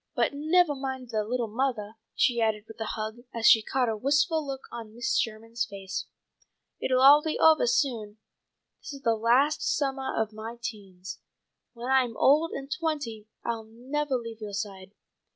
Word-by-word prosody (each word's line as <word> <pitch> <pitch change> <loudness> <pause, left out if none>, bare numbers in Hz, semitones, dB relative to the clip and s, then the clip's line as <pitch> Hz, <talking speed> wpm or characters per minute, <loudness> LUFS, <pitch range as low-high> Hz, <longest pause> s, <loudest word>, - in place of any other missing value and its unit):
But - - +2
nevah 310 +2 +3
mind, 265 -3 -5
little 225 +3 -1
mothah," 220 -2 -2 0.2
she 240 -2 +2
added 215 -1 0
with 220 - -11
a 220 - -2
hug, 215 +1 -4 0.2
as 230 -1 -2
she 220 - +8
caught 255 +3 0
a 225 - 0
wistful 290 +7 +2
look 270 -2 -5
on 225 -2 -8
Mrs. 245 +2 0
Sherman's 225 +1 -3
face. 195 -3 -6 0.7
"It'll 255 0 +2
all 285 +2 +9
be 315 0 -2
ovah 320 -5 +5
soon. 230 -5 0 0.6
This 310 - -8
is 275 - -9
the 230 - +3
last 245 +7 +3
summah 270 -2 -1
of 220 -1 -1
my 225 +2 -7
teens. 195 -5 -7 0.5
When 245 +2 -4
I 265 -1 +5
am 230 -3 -6
old 305 +4 +4
and 275 +1 -6
twenty 295 -9 -3 0.2
I'll 230 -1 -2
nevah 265 +5 -2
leave 230 -2 -5
yoah 210 -1 -6
side. 195 -2 -6
235 Hz, 170 wpm, -28 LUFS, 220-275 Hz, 0.7 s, all